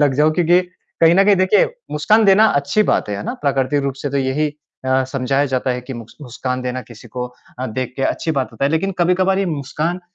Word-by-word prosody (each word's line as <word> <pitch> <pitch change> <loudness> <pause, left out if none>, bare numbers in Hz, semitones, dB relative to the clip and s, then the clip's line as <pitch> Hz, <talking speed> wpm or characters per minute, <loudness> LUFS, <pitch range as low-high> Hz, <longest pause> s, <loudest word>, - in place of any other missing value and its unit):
लग 145 -3 +3
जाऊँ 155 +2 +3
क्योंकि, 175 +1 +4 0.4
कहीं 165 +1 +7
न 195 +1 +5
कहीं 205 -1 +5
देखिए 185 +2 +4 0.3
मुस्कान 210 +9 +3
देना 200 +3 +6
अच्छी 145 +10 +1
बात - - 0
है, 105 - -2
है 100 - -5
ना? - - -3
प्राकृतिक 140 0 +1
रूप 135 -1 -2
से 145 - -2
तो 140 - -1
यही 135 +3 0 0.4
अ, 130 0 +2
समझाया 135 +2 0
जाता 130 0 -1
है 125 0 -2
कि 125 +2 -8
मुस्क 115 -1 -10
मुस्कान 125 0 -4
देना 125 0 -3
किसी 120 -1 -14
को 125 +2 -4 0.3
अ, 130 - -2
देख 125 +2 -4
के 135 - -3
अच्छी 160 - -1
बात 130 - -3
होता - - -2
है। 140 - +2
लेकिन 180 +5 0
कभी-कभार 185 +2 +2
ये 195 - 0
मुस्कान 155 +3 -3
140 Hz, 235 wpm, -19 LUFS, 130-175 Hz, 0.4 s, कहीं